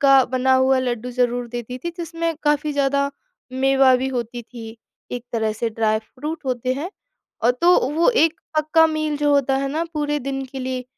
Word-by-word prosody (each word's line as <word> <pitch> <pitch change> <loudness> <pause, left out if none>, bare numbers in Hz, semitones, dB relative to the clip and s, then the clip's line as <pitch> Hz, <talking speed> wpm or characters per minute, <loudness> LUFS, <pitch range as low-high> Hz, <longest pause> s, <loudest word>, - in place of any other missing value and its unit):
का 275 -2 +6
बना 260 +1 +1
हुआ 260 0 +4
लड्डू 250 -1 -2
ज़रूर 245 0 0
देती 240 +1 -6
थी, 340 +6 -4
जिसमें 330 -1 -2
काफ़ी 295 0 +1
ज़्यादा 280 0 +1 0.4
मेवा 270 0 +4
भी 260 +1 -2
होती 240 -1 -4
थी। 225 -1 -10 0.4
एक 245 -1 -4
तरह 220 -2 0
से 230 +2 -2
ड्राई 215 -1 +1
फ्रूट 295 +7 -7
होते 255 0 -1
हैं 320 +8 -4 0.5
और 235 - +5
तो 355 +1 +6 0.2
वो 335 +6 +3
एक 325 -8 +2 0.2
पक्का 320 +1 +4
मील 310 -1 -1
जो 295 0 +1
होता 270 -1 +2
है 275 0 -1
ना 320 +3 -1
पूरे 295 0 0
दिन 270 +1 -3
के 265 +1 -8
लिए 255 -1 -3
265 Hz, 190 wpm, -21 LUFS, 245-295 Hz, 0.5 s, का